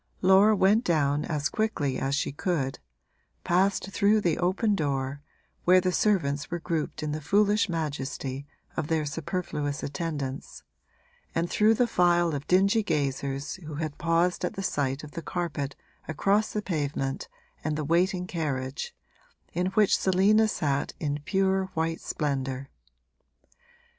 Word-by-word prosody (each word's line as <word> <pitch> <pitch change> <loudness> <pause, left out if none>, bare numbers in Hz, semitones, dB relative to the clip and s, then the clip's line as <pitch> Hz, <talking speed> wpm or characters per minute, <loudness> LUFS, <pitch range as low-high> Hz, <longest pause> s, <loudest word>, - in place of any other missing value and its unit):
Laura 195 +3 +6
went 205 +4 +4
down 150 - +1
as 150 -2 -1
quickly 150 -13 -1
as 135 +1 0
she 145 - -1
could, 140 -3 -2 0.6
passed 190 +2 +1
through 205 +2 +3
the 175 -6 0
open 190 +5 +1
door, 140 -4 -1 0.4
where 185 +1 +6
the 185 0 0
servants 165 -9 +1
were 175 - -2
grouped 165 -2 -3
in 150 - -2
the 155 +1 -3
foolish 205 +6 +3
majesty 140 -4 -3 0.3
of 150 - -2
their 160 -1 0
superfluous 145 -2 -3
attendance, 145 -3 -4 0.7
and 170 +1 0
through 215 +1 +4
the 245 - +3
file 175 -5 +3
of 140 0 -4
dingy 195 +4 +4
gazers 140 -5 -2
who 155 - -6
had 155 -1 -4
paused 170 +2 +1
at - - -2
the 195 - -4
sight 140 -4 -1
of 150 - -9
the 165 - -6
carpet 155 -6 -3 0.3
across 200 +7 +1
the 210 - -2
pavement 145 -6 -2 0.4
and 155 0 -1
the 155 - -2
waiting 180 +3 +2
carriage, 150 - -3 0.6
in 180 +1 0
which 195 +1 +3
Selina 200 +4 +4
sat 145 -9 -1
in 145 -2 -2
pure 190 -1 +2
white 165 0 -1
splendour. 135 -2 -3
165 Hz, 145 wpm, -27 LUFS, 145-190 Hz, 0.7 s, Laura